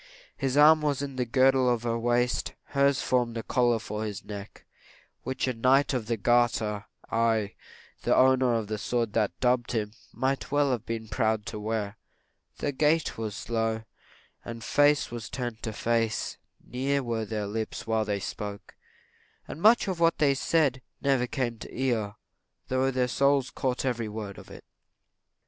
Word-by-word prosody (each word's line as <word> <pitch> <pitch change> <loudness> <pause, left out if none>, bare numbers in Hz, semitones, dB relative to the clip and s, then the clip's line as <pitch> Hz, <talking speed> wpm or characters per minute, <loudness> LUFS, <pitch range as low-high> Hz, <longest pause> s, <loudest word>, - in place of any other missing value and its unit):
His 135 0 -1
arm 155 +1 +7
was 145 -2 +1
the 135 -3 -2
girdle 130 +1 +4
of 120 -1 0
her 115 -1 0
waist; 120 +1 0 0.2
hers 140 -1 +2
formed 120 -2 +1
a 115 - -3
collar 120 -2 +2
for 105 -1 -5
his 105 -2 -5
neck, 100 -1 -9 0.6
which 130 0 -2
a 130 - 0
knight 130 +5 +3
of 120 -4 -2
the 115 0 0
garter 110 -2 +1 0.3
aye, 115 -2 +1 0.5
the - - +2
owner 130 -2 +4
of 115 -2 -1
the 105 0 -4
sword 115 0 -1
that 90 -4 0
dubbed 125 -1 +1
him 105 -2 -2 0.2
might 135 +1 -1
well 145 -1 +3
have 120 -2 -3
been 115 -1 -4
proud 110 -1 0
to 115 -3 -5
wear. 105 -1 -3 0.6
Their 145 - -1
gait 150 0 +1
was 110 -2 -3
slow, 115 +1 -2 0.6
and 115 -1 -7
face 145 -2 +3
was 120 -1 -6
turned 120 -3 -4
to 110 - -3
face; 115 0 -1 0.3
near 135 +3 -1
were 115 -2 -2
their 105 -1 -3
lips 110 +2 -4
while 110 -1 +1
they 105 -1 -2
spoke; 100 0 -6 0.7
and 160 - -8
much 225 +3 +5
of 185 -3 -2
what 165 0 +3
they 145 -2 +4
said 135 -2 +1 0.2
never 135 -3 +1
came 120 -3 -2
to - - -8
the - - -10
ear, 115 -6 0 0.5
though 130 +1 +2
their 130 -1 +1
souls 140 +1 +2
caught 130 -2 -1
up - - +3
every 115 -3 -3
word 105 -2 -6
of - - -14
it. - - -12
120 Hz, 175 wpm, -28 LUFS, 110-130 Hz, 0.7 s, arm